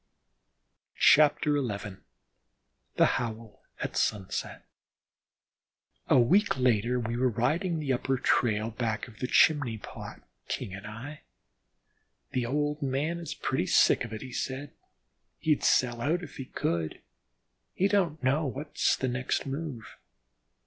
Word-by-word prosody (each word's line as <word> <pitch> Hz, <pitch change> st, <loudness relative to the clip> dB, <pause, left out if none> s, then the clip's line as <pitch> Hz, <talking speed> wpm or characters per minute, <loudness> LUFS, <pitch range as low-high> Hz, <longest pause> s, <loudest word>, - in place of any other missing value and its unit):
XI 150 Hz, 0 st, +7 dB, 0.2 s
THE 105 Hz, -10 st, -2 dB, 1.0 s
HOWL 115 Hz, -2 st, -3 dB, 0.2 s
AT -, -, -3 dB
SUNSET 100 Hz, -3 st, -2 dB, 1.4 s
A -, -, +5 dB
week 185 Hz, -, +3 dB
later 125 Hz, -1 st, +2 dB
we 115 Hz, 0 st, -3 dB
were 125 Hz, +1 st, +2 dB
riding 155 Hz, -, 0 dB
the 145 Hz, -4 st, -1 dB
upper 130 Hz, +2 st, 0 dB
trail 110 Hz, -2 st, +1 dB
back 110 Hz, -1 st, -2 dB
of 110 Hz, -3 st, -15 dB
the 125 Hz, -, -2 dB
Chimney 135 Hz, -6 st, +4 dB
Pot, -, -, -10 dB, 0.2 s
King 95 Hz, -, -4 dB
and 100 Hz, +1 st, -8 dB
I. 125 Hz, +8 st, -8 dB, 1.1 s
"The 125 Hz, -2 st, -1 dB
old 150 Hz, +3 st, -1 dB
man 145 Hz, +5 st, -1 dB
is 170 Hz, -3 st, -6 dB
pretty -, -, -1 dB
sick -, -, +4 dB
of 115 Hz, -, -7 dB
it," 110 Hz, +2 st, -6 dB
he 130 Hz, -, -8 dB
said. 135 Hz, +3 st, -4 dB, 0.7 s
"He'd 155 Hz, -2 st, +1 dB
sell 120 Hz, -2 st, +2 dB
out 165 Hz, +8 st, 0 dB
if -, -, -10 dB
he 135 Hz, -, -5 dB
could. 85 Hz, -9 st, -3 dB, 0.7 s
He 195 Hz, -, +3 dB
don't 175 Hz, -8 st, 0 dB
know 140 Hz, +4 st, +2 dB
what's 145 Hz, +4 st, 0 dB
the 130 Hz, -, -1 dB
next 125 Hz, +1 st, -1 dB
move." 135 Hz, -6 st, -6 dB
130 Hz, 130 wpm, -29 LUFS, 115-150 Hz, 1.4 s, XI